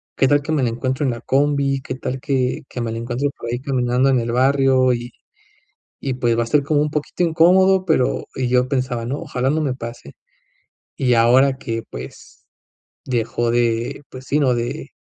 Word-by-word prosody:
qué 135 - +3
tal 145 +1 +3
que 155 - -5
me 150 -4 +1
la 120 - +2
encuentro 130 +4 -2
en 130 - +1
la 120 - -6
combi, 140 0 +1
qué - - -5
tal 130 0 -4
que 135 +1 -1
que 125 - -6
me 115 -1 -2
la 115 - -4
encuentro 120 +4 -2
por 115 - -6
ahí 120 - -2
caminando 130 -1 +1
en 130 -2 +3
el 115 0 -2
barrio, 130 0 +3
y 120 0 -5 0.9
y 135 -2 -3
pues, 120 -2 +1
va - - +2
a - - +2
estar 145 +4 +2
como 145 0 +1
un 150 - 0
poquito 150 +4 -2
incómodo", 185 +3 +4
pero, 160 -7 +1
y 130 -1 -1
yo 125 +1 +2
pensaba: 130 -4 -1
"No, 135 +5 -3
ojalá 135 -5 -2
no 155 +3 +1
me 140 -4 -1
pase". 115 - -9 0.8
Y 125 -2 +2
ahora 130 +4 +4
que, 115 -4 -4
pues, 65 +2 -11 0.6
dejó 120 -1 -1
de, 120 +2 0
pues 130 0 -10
sí, 145 - +1
no 135 -4 +2
de 120 0 -4
130 Hz, 205 wpm, -20 LUFS, 120-140 Hz, 0.9 s, incómodo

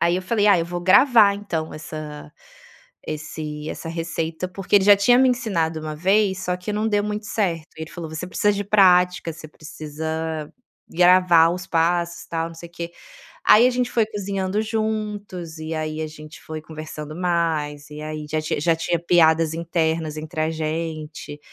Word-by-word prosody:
aí 170 +1 +3
eu 185 - -3
falei: 210 +1 +1
"Ah 200 -4 +6
eu 165 - 0
vou 175 0 -5
gravar 205 +2 +6
então 170 -6 -4
essa 155 -1 -8 0.7
esse 155 0 -5
essa - - -6
receita, 165 +1 -3
porque 195 +2 +1
ele 190 - +4
já 205 -1 +8
tinha 245 +5 +4
me 260 0 +5
ensinado 170 -11 -1
uma 155 0 -5
vez, 190 +2 +2
só 180 0 -1
que 180 +3 -5
não 215 +1 0
deu 205 -1 +1
muito 210 0 -4
certo. 170 -8 -1
Ele 160 0 -7
falou: 165 -3 -7
"Você 160 +3 -5
precisa 205 +3 +1
de 205 0 -3
prática 180 -4 +4
você 155 -1 -11
precisa 155 0 -5 0.4
gravar 175 -1 +5
os 180 +2 -5
passos 170 +1 0
tal 165 0 -2
não 165 - -12
sei 170 +1 -10
o - - -31
quê". 170 0 -6 0.5
Aí 235 +4 +7
a - - +3
gente 245 0 -1
foi 225 -2 +2
cozinhando 200 -1 -2
juntos 210 -6 -3
e 160 +1 -5
aí 155 0 -3
a 155 - -2
gente 155 0 -12
foi 155 -1 -7
conversando 155 -1 -8
mais 160 -5 -1
e 150 - -8
aí 155 0 -5
já 155 0 -1
tinha 155 -1 -2
já 165 +1 +3
tinha 165 +1 -1
piadas 165 -2 +3
internas 160 -2 -1
entre 155 +1 -6
a 160 - +1
gente, 155 -1 -5
170 Hz, 185 wpm, -22 LUFS, 155-195 Hz, 0.7 s, já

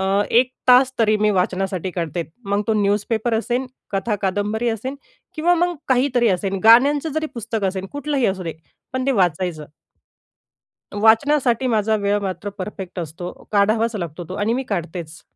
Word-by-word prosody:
अ, - - -1 0.3
1 245 +2 +4 0.2
तास 255 +1 +6
तरी 215 -1 +3
मी 210 0 +2
वाचनासाठी 185 -1 -1
काढते. 170 -1 -3 0.2
मग 200 +1 0
तो 220 - +2
न्यूजपेपर 215 +3 0
असेन, 245 +3 -1 0.3
कथा, 200 +3 0
कादंबरी 210 +4 0
असेल 230 +5 -3 0.4
किंवा 345 +3 +3
मग 350 +1 +1
काहीतरी 250 -2 +3
असेल, 195 0 0
गाण्यांचं 280 +7 +5
जरी 315 0 -1
पुस्तक 225 -2 -3
असेल 190 0 -2
कुठलंही 285 -2 0
असू 190 -1 -1
दे 165 - -3 0.4
पण 260 +1 -2
ते 275 - +3
वाचायचं. 175 - 0 1.3
वाचण्यासाठी 240 +4 +3
माझा 220 -2 +2
वेळ 205 0 +1
मात्र 190 0 -4
परफेक्ट 185 -1 -6
असतो. 170 +2 -6 0.2
काढावाच 220 +3 +2
लागतो 170 -1 -5
तो 185 - -6
आणि 205 +3 0
मी 260 +3 -1
काढतेच. 165 -1 -4
215 Hz, 155 wpm, -21 LUFS, 190-245 Hz, 1.3 s, तास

